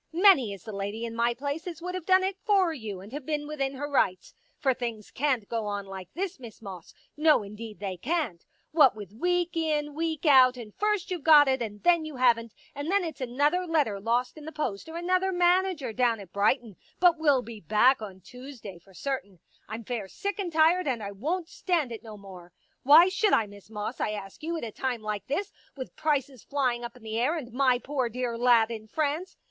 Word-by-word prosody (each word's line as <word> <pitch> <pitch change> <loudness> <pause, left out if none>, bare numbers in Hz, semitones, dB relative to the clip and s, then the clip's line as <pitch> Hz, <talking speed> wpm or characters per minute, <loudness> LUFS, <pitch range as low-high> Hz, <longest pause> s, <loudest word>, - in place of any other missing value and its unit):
Many 335 - +5
is 195 -3 -9
the 220 - -7
lady 205 +3 -4
in 230 0 -6
my 235 +1 +1
place 285 +6 -4
as 335 -3 -6
would 360 +1 -5
have 365 -3 -5
done 375 0 +5
it 385 0 -1
for 390 -6 +3
you 215 -9 -6
and 200 +3 -12
have 290 0 -5
been 295 +1 -2
within 275 -2 -3
her 290 +2 -4
rights. 190 -10 0 0.2
For 270 -2 +2
things 235 -4 -5
can't 255 -7 0
go 225 -2 -2
on 205 -1 -3
like 190 -1 -9
this. 375 -2 -3
Miss 235 -4 -11
Moss, 190 -6 -10 0.2
no 305 -6 +4
indeed 210 +1 -9
they 195 -3 -4
can't. 285 - -2 0.3
What 300 -7 +5
with 205 -2 -9
week 355 +7 0
in 300 -2 0
week 320 0 -3
out 260 -3 +6
and 220 -4 -9
first 420 -3 -1
you've 355 -3 -2
got 295 -2 +7
it 265 -1 +1
and 210 -3 -5
then 345 -2 +4
you 310 -2 -7
haven't, 230 -3 +2 0.2
and 285 +3 -5
then 400 -1 +3
it's 315 -5 -6
another 290 +9 +1
letter 290 -12 +1
lost 240 +6 -1
in 295 - -11
the 315 - -6
post 300 -4 -4
or 325 - -6
another 370 +2 +1
manager 355 -7 +2
down 235 -2 +2
at 190 -3 -12
Brighton 210 0 +1 0.2
but 350 -2 +5
will 285 -5 +3
be 225 -2 -9
back 220 - +3
on 190 -3 -8
Tuesday 245 -3 -10
for 190 +2 -21
certain 255 -8 -4 0.2
— - - -35
I'm 225 +2 -5
fair 225 -3 -4
sick 405 - -4
and 370 -4 -2
tired 325 +2 +3
and 240 -5 -1
I 200 - -5
won't 320 - -3
stand 330 -8 -1
it 225 - -6
no 220 -2 -10
more. 185 -3 -12 0.3
Why 310 +6 +8
should 410 +2 +1
I, 225 - +4
Miss 205 0 -15
Moss, 210 +3 -5
I 210 - -1
ask 195 -2 -8
you, 330 +2 -3
at - - -6
a 225 - -4
time 245 -1 -3
like 210 -2 -4
this, 385 +9 -2 0.3
with 260 - -7
prices 280 -5 -1
flying 255 -4 -1
up 240 +1 -7
in 245 - -18
the 220 0 -3
air 290 +8 +1
and 245 -7 -7
my 255 -1 +3
poor 260 -1 -2
dear 245 0 -3
lad 235 -1 +4
in 220 -1 -7
France 310 - -2
255 Hz, 225 wpm, -28 LUFS, 220-320 Hz, 0.3 s, Why